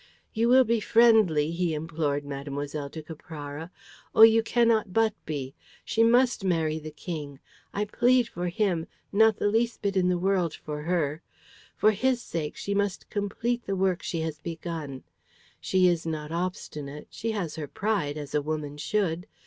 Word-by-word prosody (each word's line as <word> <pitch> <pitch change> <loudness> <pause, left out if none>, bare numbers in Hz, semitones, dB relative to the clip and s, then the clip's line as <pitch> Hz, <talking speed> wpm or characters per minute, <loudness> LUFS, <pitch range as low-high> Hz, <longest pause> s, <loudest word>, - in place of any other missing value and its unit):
"You 230 +1 +2
will 260 +1 +7
be 235 -1 +1
friendly," 215 -10 +4
he 170 -1 0
implored 150 -2 -2
Mlle. 140 +1 -4
de 160 +2 -8
Caprara. 155 0 -8 0.5
"Oh, 220 - +9
you 225 0 +8
cannot 225 -3 +2
but 225 -1 +3
be! 140 -3 -4 0.3
She 225 - +2
must 240 -1 +4
marry 160 -4 +1
the 155 0 -7
King. 150 -2 -6 0.3
I 205 +1 -1
plead 245 +3 +3
for 175 -4 -4
him, 175 -3 0 0.2
not 220 +1 +4
the - - +1
least 225 +2 0
bit 200 -1 0
in 180 -1 +3
the 180 - +2
world 180 -3 +1
for 150 -1 -6
her. 160 -2 -1 0.6
For 215 - +5
his 255 +4 +1
sake 160 -9 -4
she 200 - -3
must 200 -2 -1
complete 230 +4 -2
the 195 - 0
work 185 -2 +1
she 165 - -3
has 160 -2 -4
begun. 160 -5 -6 0.6
She 185 -1 +3
is 170 -2 +1
not 155 -1 -4
obstinate; 150 -4 -4
she 225 - -4
has 180 -7 -3
her 155 -2 -5
pride 185 -6 -1
as 145 -2 -7
a 150 - +2
woman 150 -1 -4
should. 170 +3 -1
175 Hz, 170 wpm, -27 LUFS, 150-215 Hz, 0.6 s, Oh